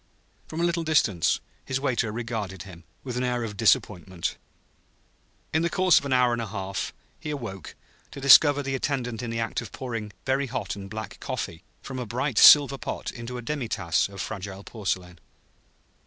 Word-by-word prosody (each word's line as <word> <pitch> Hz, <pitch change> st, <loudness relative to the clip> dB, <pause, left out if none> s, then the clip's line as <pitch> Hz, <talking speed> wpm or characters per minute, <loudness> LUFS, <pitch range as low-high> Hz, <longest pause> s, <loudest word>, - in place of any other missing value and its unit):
From 160 Hz, -, -6 dB
a -, -, +1 dB
little 170 Hz, -1 st, +1 dB
distance 115 Hz, -, +2 dB, 0.2 s
his 130 Hz, 0 st, -2 dB
waiter 125 Hz, -5 st, 0 dB
regarded 110 Hz, -5 st, -4 dB
him, 85 Hz, -4 st, -13 dB, 0.2 s
with 125 Hz, -2 st, -4 dB
an 125 Hz, -, 0 dB
air 125 Hz, -1 st, 0 dB
of 105 Hz, -2 st, -5 dB
disappointment. 95 Hz, -4 st, +1 dB, 1.2 s
In 160 Hz, -, +3 dB
the 170 Hz, -, +1 dB
course 185 Hz, 0 st, +4 dB
of -, -, -10 dB
an 140 Hz, -, -3 dB
hour 125 Hz, -1 st, +4 dB
and 120 Hz, -, -1 dB
a 115 Hz, -, -4 dB
half 95 Hz, -1 st, -4 dB, 0.3 s
he -, -, -6 dB
awoke, 115 Hz, -, -6 dB, 0.3 s
to -, -, -9 dB
discover 145 Hz, +1 st, +7 dB
the 135 Hz, 0 st, -3 dB
attendant 125 Hz, -4 st, -2 dB
in 120 Hz, -, -4 dB
the 115 Hz, 0 st, -3 dB
act 115 Hz, -, -2 dB
of -, -, -9 dB
pouring 115 Hz, -5 st, -5 dB
very 135 Hz, +1 st, +1 dB
hot 105 Hz, -7 st, -3 dB
and 100 Hz, -1 st, -8 dB
black 110 Hz, +1 st, -7 dB
coffee 85 Hz, +1 st, -5 dB, 0.2 s
from 130 Hz, -1 st, -6 dB
a 125 Hz, -, -4 dB
bright 125 Hz, +2 st, 0 dB
silver 140 Hz, -2 st, +8 dB
pot -, -, -4 dB
into 120 Hz, 0 st, -7 dB
a 120 Hz, -, -7 dB
demi 140 Hz, -1 st, -3 dB
tasse 90 Hz, -6 st, 0 dB
of 100 Hz, -1 st, -11 dB
fragile 100 Hz, -1 st, -6 dB
porcelain. 90 Hz, -6 st, -4 dB
120 Hz, 185 wpm, -26 LUFS, 100-135 Hz, 1.2 s, silver